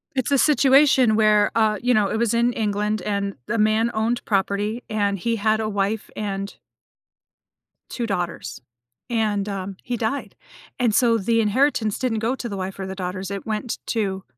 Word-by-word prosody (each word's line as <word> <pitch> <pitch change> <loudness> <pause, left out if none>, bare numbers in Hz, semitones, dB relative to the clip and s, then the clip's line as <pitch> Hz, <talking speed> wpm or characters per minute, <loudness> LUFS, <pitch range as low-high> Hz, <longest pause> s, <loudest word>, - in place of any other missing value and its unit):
It's 260 +2 -1
a 280 - +4
situation 265 -4 +5
where 210 -1 +4
uh, 215 -2 +3
you 245 +1 +2
know, 210 -2 +2
it 220 - -1
was 235 -1 +1
in 235 +1 +2
England, 210 -1 -1
and 200 0 -2
the 235 - -2
man 215 +2 +2
owned 225 +2 -1
property, 205 +3 -1
and 205 -2 0
he 230 +5 0
had 215 +1 +1
a 215 - -1
wife 205 +1 -2
and 200 -1 -4 1.3
2 240 - -3
daughters, 175 - -4 0.5
and, 210 -3 0
um, 195 -1 -5
he 245 - -3
died. 230 +4 -3 0.4
And 235 -4 +2
so 230 -1 +4
the 230 +3 +1
inheritance 225 -1 +1
didn't 240 -4 -1
go 230 +4 0
to 240 -3 -6
the 200 - -5
wife 190 +1 -5
or 190 - -3
the 190 0 -6
daughters, 185 +1 -4
it 200 - -5
went 220 +1 -3
to 195 -4 -1
215 Hz, 180 wpm, -23 LUFS, 200-235 Hz, 1.3 s, situation